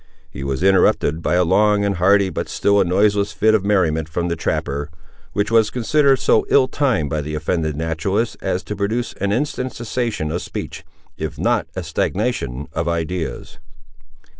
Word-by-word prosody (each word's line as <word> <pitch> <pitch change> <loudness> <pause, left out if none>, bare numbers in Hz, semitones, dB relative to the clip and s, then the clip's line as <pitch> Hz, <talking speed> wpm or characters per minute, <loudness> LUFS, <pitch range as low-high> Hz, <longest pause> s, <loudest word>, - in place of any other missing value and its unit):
He - - -7
was 70 +4 -2
interrupted 90 -4 +3
by 90 - 0
a 90 - +4
long 100 +3 +3
and 100 -2 -1
hearty, 95 +2 +3
but - - -4
still 100 0 +2
a - - +4
noiseless 100 +3 +2
fit 110 +1 +3
of 110 -3 +2
merriment, 85 -6 +1
from 85 +2 -2
the 85 - -1
trapper, 70 -2 -2 0.4
which 100 +2 -1
was 115 -2 +4
considered 135 +3 +2
so - - +3
ill 130 -2 +5
timed 125 - 0
by 75 - -1
the 75 +1 -5
offended 80 0 -1
naturalist, 80 +8 -1
as 95 0 -2
to 105 - -5
produce 110 +4 -2
an 100 0 0
instant 130 +2 -2
cessation 115 -8 -3
of 85 - -2
speech, - - -6 0.3
if - - -5
not - - +1
a - - -3
stagnation 75 - -2
of 85 +1 -2
ideas. 85 0 -3
95 Hz, 175 wpm, -20 LUFS, 80-105 Hz, 0.4 s, ill